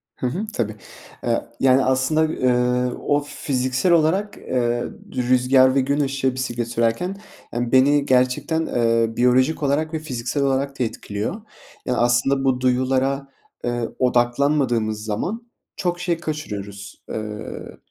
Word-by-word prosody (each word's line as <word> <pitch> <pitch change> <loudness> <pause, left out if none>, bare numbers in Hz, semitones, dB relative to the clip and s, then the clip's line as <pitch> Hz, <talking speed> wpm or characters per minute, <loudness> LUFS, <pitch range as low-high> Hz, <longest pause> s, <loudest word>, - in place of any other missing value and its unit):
Hı 125 - -2
hı, 185 - -3
tabii. 110 -3 -2 0.5
Eee, 120 -1 0
yani, 130 0 +4
aslında, 130 +4 +2
ııı, 125 -4 +1
o 145 0 +1
fiziksel 130 +4 0
olarak, 175 +5 +2
eee, 120 -1 -1 0.3
rüzgâr 130 +1 +4
ve 135 - +4
gün 140 +3 0
ışığı 135 -2 0
bisiklet 120 -2 -2
sürerken, 115 +11 0 0.4
yani, 120 0 -2
beni 140 +2 +4
gerçekten, 130 +5 +2
ııı, 115 -1 +1
biyolojik 130 +6 +3
olarak 150 +3 0
ve 160 - -1
fiziksel 135 -2 -3
olarak 135 0 0
da - - +2
etkiliyor. 110 - -4 0.4
Yani, 125 - 0
aslında 120 +3 +2
bu 130 -2 +1
duyulara, 130 +2 +1 0.4
ııı, 120 -1 -2
odaklanmadığımız 120 -3 +1
zaman 205 - -4 0.2
çok 175 -1 -2
şey 175 -1 0
kaçırıyoruz. 105 - -6
Iıı, 110 0 -6
130 Hz, 130 wpm, -22 LUFS, 120-145 Hz, 0.5 s, yani